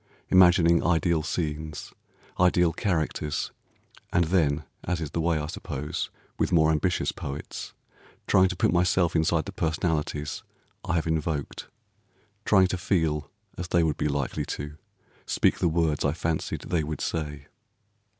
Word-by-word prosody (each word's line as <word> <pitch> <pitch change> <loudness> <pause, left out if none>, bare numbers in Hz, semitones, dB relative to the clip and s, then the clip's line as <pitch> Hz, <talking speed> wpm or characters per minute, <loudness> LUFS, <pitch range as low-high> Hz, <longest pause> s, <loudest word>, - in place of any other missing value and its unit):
Imagining 90 -2 +6
ideal 85 -1 +2
scenes, 75 -2 -4 0.5
ideal 90 -2 +4
characters, 80 -5 -1 0.6
and 90 - +3
then, 80 -4 +1 0.2
as 90 -1 -1
is 80 -3 -4
the 85 - -1
way, 85 -1 +2
I 75 - -2
suppose, 75 -2 -4 0.3
with - - +1
more 80 -2 +5
ambitious 85 +4 +1
poets, 70 +1 -6 0.5
trying 95 0 +5
to 90 - -3
put - - +2
myself 90 -1 +2
inside 80 0 +2
the - - -6
personalities 80 -4 -1 0.4
I 90 - -1
have 85 - +1
invoked, 80 -2 -2 0.8
trying 95 -3 +5
to 95 - -2
feel 80 -5 0 0.3
as 90 - -3
they 85 -1 +3
would 80 -2 0
be - - 0
likely 70 -2 -1
to, 75 +1 -5 0.5
speak - - +2
the 85 - +2
words 80 -2 +1
I 70 - +2
fancied 80 -1 -2
they 85 -3 -1
would 75 -1 -4
say. 75 -3 -3
80 Hz, 145 wpm, -27 LUFS, 75-85 Hz, 0.8 s, Imagining